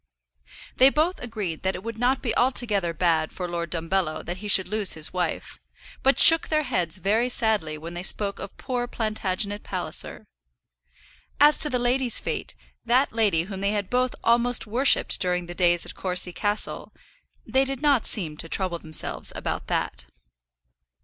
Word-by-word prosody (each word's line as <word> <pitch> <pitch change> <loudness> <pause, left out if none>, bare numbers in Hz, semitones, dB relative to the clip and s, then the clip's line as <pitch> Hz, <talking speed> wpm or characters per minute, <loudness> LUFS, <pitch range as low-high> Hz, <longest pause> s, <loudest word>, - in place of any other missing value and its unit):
They 260 +1 +7
both 315 +6 0
agreed 210 -9 -5
that 190 0 -1
it 185 - -8
would 230 0 -7
not 255 +2 +1
be 230 -4 -1
altogether 220 -8 +1
bad 165 -1 0
for 180 - -5
Lord 170 -1 -4
Dumbello 165 -1 -2
that 175 +2 -5
he 210 +2 -7
should 190 -2 +4
lose 210 -1 +2
his 155 -1 -3
wife, 180 -3 -3 0.4
but 270 +1 +3
shook 325 0 +8
their 310 -1 0
heads 180 - -2
very 215 +7 0
sadly 215 -11 +1
when 165 +3 -9
they 175 - -5
spoke 200 +2 -1
of - - -9
poor 250 -2 -3
Plantagenet 210 -3 -2
Palliser. - - -5 1.1
As 295 +1 +5
to 300 - +6
the 255 - 0
lady's 245 0 +1
fate, - - -5 0.3
that 245 +3 +1
lady 205 -8 +1
whom 190 +1 -7
they 200 +1 0
had 205 -3 -3
both 250 0 0
almost 235 +1 +2
worshipped 245 +6 +1
during 180 -1 -1
the 175 - -8
days 175 -1 +2
at - - -7
Courcy 180 -1 0
Castle, 205 +2 -2 0.5
they 265 +4 +2
did 270 +1 -5
not 280 -6 +2
seem 160 -7 0
to 165 - -8
trouble 180 -2 0
themselves 155 -1 +1
about - - -4
that. 60 0 -3
205 Hz, 170 wpm, -24 LUFS, 175-245 Hz, 1.1 s, shook